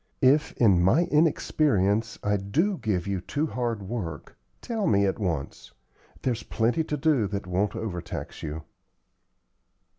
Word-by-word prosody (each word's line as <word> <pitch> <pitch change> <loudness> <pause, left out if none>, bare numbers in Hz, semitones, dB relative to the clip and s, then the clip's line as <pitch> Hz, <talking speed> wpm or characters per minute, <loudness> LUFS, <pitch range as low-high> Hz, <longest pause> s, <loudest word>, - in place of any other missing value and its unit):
If, 140 +4 +4
in 100 -7 +4
my 115 - +4
inexperience, 115 - +2
I 105 0 +2
do 165 - 0
give 95 -5 -1
you 100 -2 -2
too 145 - -2
hard 120 -7 -2
work, 95 - -5 0.2
tell 225 -4 -2
me 100 -1 +4
at 95 - -1
once. 85 -9 -3 0.5
There's 120 -4 0
plenty 120 +11 0
to 150 -1 -3
do 135 -7 +2
that 100 -1 -4
won't 95 +3 -1
overtax 90 -6 -5
you." 80 0 -5
110 Hz, 140 wpm, -26 LUFS, 95-145 Hz, 0.5 s, If